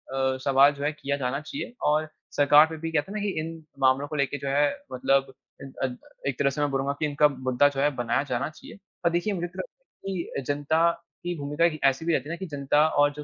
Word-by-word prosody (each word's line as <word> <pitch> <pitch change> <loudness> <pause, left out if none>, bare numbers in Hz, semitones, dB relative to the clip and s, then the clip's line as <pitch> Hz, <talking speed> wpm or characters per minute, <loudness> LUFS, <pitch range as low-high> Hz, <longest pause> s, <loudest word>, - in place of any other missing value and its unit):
मै 135 0 +1
अ, - - -5
सवाल 140 +1 +6
जो 140 0 -7
है 150 - +1
किया 140 -1 -3
जाना 130 0 -1
चाहिए। 240 - -6
और 155 +1 +2 0.3
सरकार 145 +1 +7
पे 160 0 -7
भी 165 +1 -4
कहते 155 +3 -1
है 215 - -4
ना - - -4
कि 205 - 0
इन 165 0 -6 0.2
मामलों 135 +1 +3
को 150 - -6
लेके 140 0 0
जो 140 - -6
है 145 +2 +3 0.3
मतलब 135 +1 +1 0.3
इद 135 -1 -9
अद 125 -2 -2 0.3
एक 135 -3 -2
तरह 140 - +3
से 140 +2 -3
मैं 145 - +2
बोलूँगा 135 +1 0
कि 155 - +1
इनका 150 0 +4
मुद्दा 130 0 +2
जो 140 -1 -5
है 145 - +4
बनाया 120 +2 0
जाना 130 0 -2
चाहिए। 155 - -13 0.3
पर 170 - +4
देखिए 175 +5 0
मुझे 175 -2 -2
तो 175 - -12
लगता - - -8 0.3
है - - -2
कि 170 -5 -4
जनता 155 +4 +2 0.3
की 175 0 -2
भूमिका 145 +3 0
एक 155 -2 0
ऐसी 135 +4 +2
भी 170 - +2
रहती 145 0 -1
है - - -2
ना - - -2
कि 190 - -5
जनता 145 0 +2
और 145 -2 +3
जो 150 +1 -7
145 Hz, 265 wpm, -26 LUFS, 135-160 Hz, 0.3 s, सरकार